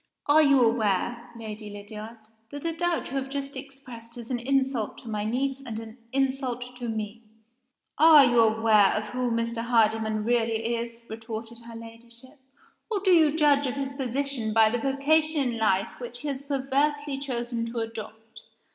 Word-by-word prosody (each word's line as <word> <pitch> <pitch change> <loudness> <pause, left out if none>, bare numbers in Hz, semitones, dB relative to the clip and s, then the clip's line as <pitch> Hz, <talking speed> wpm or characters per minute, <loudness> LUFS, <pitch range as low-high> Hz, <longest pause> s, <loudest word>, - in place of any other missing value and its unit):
"As 305 +1 +6
you 280 -1 +5
aware, 230 +2 0
Lady 215 -1 -7
Lydiard, 210 +2 -9 0.3
that 285 +2 -8
the 335 - 0
doubt 345 -4 -1
you 275 - -2
have 270 0 -3
just 275 0 -5
expressed 260 -4 -10
is 235 +1 -8
an 245 - -1
insult 265 -3 0
to - - -13
my 210 -1 -2
niece, 265 +4 -1
and 225 -4 -5
a 225 0 -10 0.2
insult 260 -2 -2
to 240 -2 -4
Me?" 220 0 -4 0.8
"Are 310 -2 +9
you 240 -1 +3
aware 220 -2 +5
of 215 - -1
who 250 -1 0
Mr. 230 0 -1
Hardyman 220 -2 +2
really 230 0 0
is?" 235 0 -5
retorted 225 +1 -7
her 230 - -9
Ladyship. 235 +4 -13 0.5
"Or 430 -3 0
do 380 -1 +3
you 320 -3 +5
judge 285 -2 +4
of 255 - -3
his 275 0 -3
position 265 -3 -2
by 220 -1 +5
the 240 - 0
vocation 285 0 +2
in 230 - -4
life 195 -3 +1
which 245 0 -8
he 295 - -3
has 275 -1 -4
perversely 280 +1 -1
chosen 240 -4 -3
to 235 +1 -7
adopt? 225 0 -7
240 Hz, 175 wpm, -26 LUFS, 225-275 Hz, 0.8 s, Are